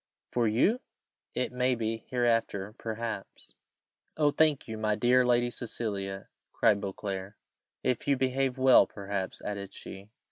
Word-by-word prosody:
"For 120 -2 +1
you? 130 - +3 0.6
It 125 - -1
may 125 0 +1
be, 115 -1 -3
hereafter, 115 -5 0
perhaps." 110 -2 -5 0.6
"Oh 150 -2 +4
thank 150 -1 +2
you, 110 - -5
my 110 -1 +1
dear 125 +3 +4
Lady 120 0 +2
Cecilia!" 100 -5 -2 0.3
cried 100 -1 +3
Beauclerc. 100 0 -5 0.5
"If 125 +3 -1
you 140 -1 +3
behave 130 0 0
well, 130 -1 +6
perhaps," 100 -2 -4
added 100 -1 -5
she. 95 +2 -9
115 Hz, 135 wpm, -29 LUFS, 100-125 Hz, 0.6 s, well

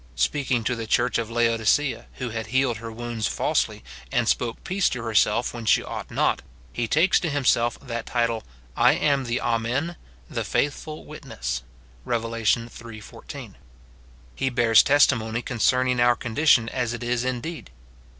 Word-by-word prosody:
Speaking 125 - 0
to 125 +3 0
the 115 -1 -5
church 120 +2 +2
of 115 -1 -3
Laodicea, 115 +4 +1
who 125 - -5
had 110 -1 -4
healed 130 -1 +1
her 115 +1 -7
■wounds 115 -1 -3
falsely, - - 0 0.3
and - - +1
spoke 120 -1 0
peace 190 +1 +1
to 125 -2 -4
herself 115 +1 +2
when 115 -2 -7
she - - +4
ought - - -6
not, - - +1 0.3
he 120 -1 -1
takes 160 - +4
to 170 - -2
himself 125 -4 +2
that 120 -4 -5
title, 115 -2 0 0.2
" - - -28
I - - +5
am 140 -3 +1
the 120 +1 -1
Amen, 120 +8 -1 0.3
the - - -3
faithful 150 +2 -2
Witness," - - -5 0.4
Rev. 115 - -1
iii. 115 0 -2
14. 105 - -10 0.8
He 130 - -1
bears 115 -3 +5
testimony 120 -5 +3
concerning 125 +1 +1
our 120 0 +5
condition 120 0 +3
as 120 -2 -2
it 120 - -6
is 120 0 0
indeed. 130 - -4
120 Hz, 160 wpm, -24 LUFS, 115-130 Hz, 0.8 s, I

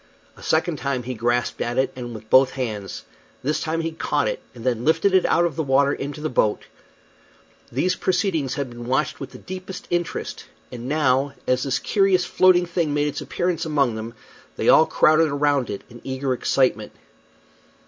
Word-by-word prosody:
A - - -16
second 160 0 0
time 135 -3 -2
he 130 +2 -4
grasped 120 +1 -1
at 120 +1 -2
it, 130 - +1
and 120 -2 -6
with 110 0 -10
both 130 +3 +6
hands. 110 -7 -5 0.4
This 150 +4 0
time 165 +1 -1
he 165 0 -2
caught 160 - -1
it, - - -3
and 115 - -10
then 120 -2 0
lifted 165 +6 +2
it 190 - +4
out 175 - +3
of 170 - -2
the 160 - -1
water 140 0 +3
into 145 +2 -5
the 155 - -1
boat. 110 -4 +1 1.1
These 180 +9 0
proceedings 180 -8 0
had 140 -3 -2
been 120 0 -8
watched 130 +1 0
with 135 - -6
the - - -12
deepest 185 0 -8
interest; 175 -2 -3 0.3
and 125 +1 -6
now, 140 -2 +2
as 125 0 +1
this 135 0 0
curious 195 0 +2
floating 185 -1 +4
thing 170 -4 -1
made 145 0 +1
its - - -5
appearance 175 -2 -2
among 145 -7 +1
them, 110 +1 -6 0.4
they - - +1
all 160 - +7
crowded 155 0 +4
around 145 -3 +1
it 100 - -5
in 120 0 -14
eager 130 0 -2
excitement. 125 -3 0
140 Hz, 190 wpm, -23 LUFS, 125-165 Hz, 1.1 s, all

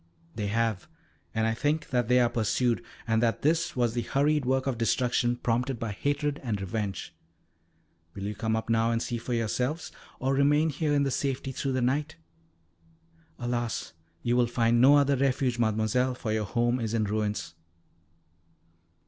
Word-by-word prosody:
"They 105 0 -3
have, 115 - -1 0.4
and 110 0 0
I 110 - +1
think 150 +6 -1
that 125 -3 +1
they 125 +1 +4
are 120 - +4
pursued, 120 +2 0 0.2
and 115 0 +2
that 115 -1 0
this 170 +3 +1
was 120 -2 +1
the 120 - -1
hurried 145 +3 +1
work 130 0 +1
of 130 -4 -2
destruction 120 +1 +1
prompted 125 +2 -1
by 115 -1 -3
hatred 145 +6 -1
and 110 -5 -2
revenge. 100 -3 -4 1.0
Will 100 - -6
you 105 +1 -2
come 110 +1 -1
up 110 - -3
now 115 0 +2
and 115 0 +1
see 120 0 -3
for 120 +1 -3
yourselves, 125 +7 -1 0.3
or 135 +1 0
remain 145 +3 +3
here 150 0 0
in 140 -1 +2
safety 135 0 -2
through 135 +1 -2
the 130 -1 0
night? 145 +5 0 1.2
Alas! 120 -1 -3 0.3
you 120 0 +1
will 125 -1 +3
find 115 0 +2
no 140 +3 +7
other 140 -1 +3
refuge, 130 -2 +1
Mademoiselle, 110 +3 +1
for 115 -3 -4
your 110 -1 0
home 120 +5 +1
is 115 -1 -2
in 110 - +2
ruins." 105 -3 -2
120 Hz, 170 wpm, -28 LUFS, 115-135 Hz, 1.2 s, no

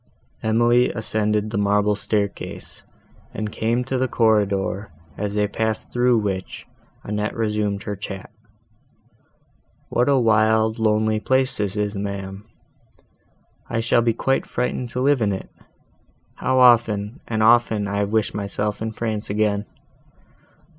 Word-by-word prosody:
Emily 120 +2 +3
ascended 105 -1 -1
the 105 - -1
marble 105 +1 +2
staircase, 100 -1 -3 0.5
and 105 0 -3
came 115 +3 0
to 130 0 -2
the 130 - +1
corridor, 105 -3 +1 0.3
as 105 +2 -3
they 105 0 +2
passed 110 +1 -3
through 125 0 +3
which, 95 -3 -3 0.4
Annette 105 +1 -3
resumed 105 -2 -1
her 105 - -4 2.0
chat—"What 125 +3 +2
a 140 - +4
wild 110 -1 +3
lonely 110 0 +2
place 130 +3 +1
this 100 -1 -1
is, 105 -1 -1
ma'am! 100 0 -5 1.2
I 115 - -1
shall 120 +1 +3
be 115 -1 +1
quite 135 +3 0
frightened 125 0 -2
to 125 - -3
live 140 -1 +3
in 105 -2 +2
it. 95 - -5 0.9
How 130 +1 0
often, 115 -1 +4
and 110 -1 0
often 115 -2 +4
have 100 0 -3
I 100 - +1
wished 110 +1 0
myself 105 +1 -3
in 110 0 -3
France 110 -2 -2
again! 105 0 0
110 Hz, 135 wpm, -22 LUFS, 105-115 Hz, 2.0 s, a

